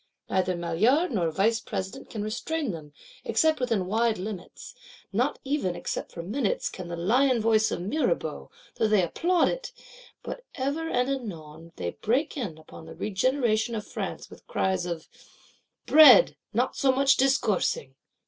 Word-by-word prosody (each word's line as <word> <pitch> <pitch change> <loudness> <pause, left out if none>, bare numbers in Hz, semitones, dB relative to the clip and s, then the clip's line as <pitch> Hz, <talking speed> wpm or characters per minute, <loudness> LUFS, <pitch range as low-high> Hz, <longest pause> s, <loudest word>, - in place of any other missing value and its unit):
Neither 185 -1 +1
Maillard 215 - +2
nor 180 -8 0
Vice 215 +7 +1
President 190 0 -6
can 215 -2 -4
restrain 265 +5 -2
them, 155 -4 -9 0.3
except 310 +7 +2
within 230 -7 0
wide 225 +3 +1
limits; 190 0 -7 0.4
not - - +1
even, 270 -11 -1
except - - -4
for 170 - -7
minutes, 215 +4 -1
can 185 -2 -8
the 170 - -5
lion 245 +9 +2
voice 220 -1 +3
of - - -3
Mirabeau, 300 - -1 0.3
though 220 - +2
they 210 -3 +3
applaud 345 - +2
it: - - -3 0.5
but - - -6
ever 290 +4 -2
and 250 +1 +1
anon 165 - -6
they 85 -1 -3
break 255 +8 -1
in 205 - -4
upon 160 0 -13
the - - -10
regeneration 230 +1 0
of 210 - -4
France - - -5
with - - -16
cries 185 -2 0
of: 170 -2 -5 0.8
'Bread; 315 +11 +8 0.2
not - - 0
so 270 -2 +3
much 275 +1 +4
discoursing! 270 - +1
220 Hz, 155 wpm, -27 LUFS, 185-275 Hz, 0.8 s, Bread